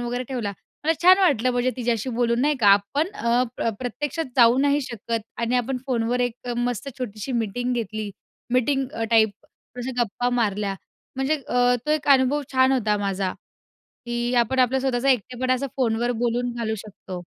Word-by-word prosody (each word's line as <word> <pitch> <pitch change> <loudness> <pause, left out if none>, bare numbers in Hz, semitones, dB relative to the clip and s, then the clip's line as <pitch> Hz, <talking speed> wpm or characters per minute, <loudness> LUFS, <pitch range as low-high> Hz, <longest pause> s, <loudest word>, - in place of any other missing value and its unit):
वगैरे 245 +1 -3
ठेवला. 235 -6 -3 0.3
मला 325 - +4
छान 370 +2 +8
वाटलं 275 - +3
म्हणजे 245 +1 +1
तिच्याशी 240 0 -1
बोलून 235 -1 +1
नाही 290 +1 +2
का. 205 - +3
आपण 205 - +3
अ, 240 - +1
प्र 230 - 0
प्रत्यक्षात 295 +6 -3
जाऊ 240 +1 +6
नाही 285 +1 +3
शकत 230 -2 -4 0.2
आणि 235 +1 +1
आपण 250 +1 -1
फोनवर 245 -1 0
एक 245 0 -3
मस्त 245 +2 -2
छोटीशी 225 0 -5
मीटिंग 245 +2 -1
घेतली, 215 -2 -3 0.4
मीटिंग 270 +2 +2 0.2
टाइप 220 -2 +5 0.5
अशा 245 +2 -3
गप्पा 245 +3 -1
मारल्या, 205 -2 0 0.4
म्हणजे 270 +4 +1
अ, 245 0 +3
तो - - 0
एक 305 -1 -1
अनुभव 275 +2 +4
छान 260 0 +4
होता 215 -5 +1
माझा, 195 -2 -1 0.7
की 240 +1 -2
आपण 240 +2 +2
आपलं 255 +1 +3
स्वतःचा 260 0 0
एकटेपणा 255 +1 +1
असं 275 +2 -2
फोनवर 240 -1 +1
बोलून 240 +1 0
घालू 220 -2 -1
शकतो. 185 -3 -8
245 Hz, 165 wpm, -24 LUFS, 225-260 Hz, 0.7 s, छान